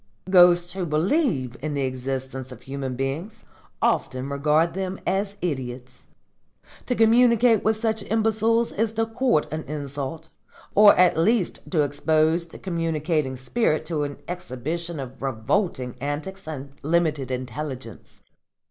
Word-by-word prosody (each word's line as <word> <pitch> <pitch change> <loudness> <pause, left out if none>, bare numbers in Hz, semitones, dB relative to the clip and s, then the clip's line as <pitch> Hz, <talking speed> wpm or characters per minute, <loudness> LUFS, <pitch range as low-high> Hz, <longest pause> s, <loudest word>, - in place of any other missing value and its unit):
Ghosts 175 -1 +6
who 190 -1 -3
believe 155 - +1
in 150 0 -3
the 140 - 0
existence 130 0 -4
of 125 - -11
human 135 -1 -4
beings 160 - -4 0.4
often 130 +2 0
regard 150 +4 +2
them 190 0 -3
as 195 +2 -1
idiots. 130 -6 -5 0.8
To 250 - 0
communicate 235 0 +5
with 220 0 +2
such 220 -1 0
imbeciles 225 +1 +2
is 220 +1 -1
to 225 0 +1
court 225 - +1
an 155 - -2
insult, 145 +2 -5 0.4
or 205 0 +8
at 180 -2 +4
least 210 +2 +1
to 155 -5 +2
expose 155 +3 +1
the - - -12
communicating 160 -5 -1
spirit 155 - 0
to 155 -2 -2
an 145 -1 -3
exhibition 170 -1 -4
of 130 -1 -8
revolting 130 - -1
antics 155 +7 -4
and 140 -3 -6
limited 155 -4 +1
intelligence. 130 -2 -6
160 Hz, 130 wpm, -24 LUFS, 135-195 Hz, 0.8 s, or